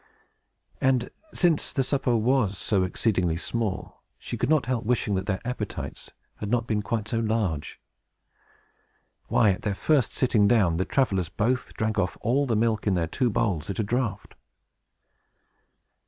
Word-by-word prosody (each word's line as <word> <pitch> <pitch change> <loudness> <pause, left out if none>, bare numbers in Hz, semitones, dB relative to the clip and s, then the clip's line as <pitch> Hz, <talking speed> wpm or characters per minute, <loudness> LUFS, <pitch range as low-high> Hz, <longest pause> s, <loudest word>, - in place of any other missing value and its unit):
And, 130 -2 +2 0.2
since 170 -4 +1
the 135 - +1
supper 130 -2 +1
was 110 -4 +2
so 100 +2 +1
exceedingly 90 -3 0
small, 100 -1 -3 0.2
she - - -6
could 120 - -1
not 155 -6 +3
help 125 -2 -1
wishing 115 -2 0
that 95 +1 -1
their 95 -3 0
appetites 120 -4 -5 0.3
had 105 - -5
not 120 0 +1
been 110 -2 0
quite 105 0 -2
so 115 +1 -1
large. 105 -9 -1 1.5
Why, 110 -4 +4
at 90 - -3
their 100 -2 -1
very - - -17
first 125 - -3
sitting 115 -6 +3
down, 100 -8 +3
the 95 - 0
travelers 95 - +1
both 125 +7 -1
drank 110 -1 -1
off 90 -2 -1
all 135 +4 +1
the 115 - +1
milk 110 -1 +1
in 100 - +3
their 85 -2 +1
two 125 - 0
bowls, 105 -8 -1
at 100 - -3
a 110 - +1
draught. 115 0 -2
110 Hz, 165 wpm, -26 LUFS, 100-120 Hz, 1.5 s, Why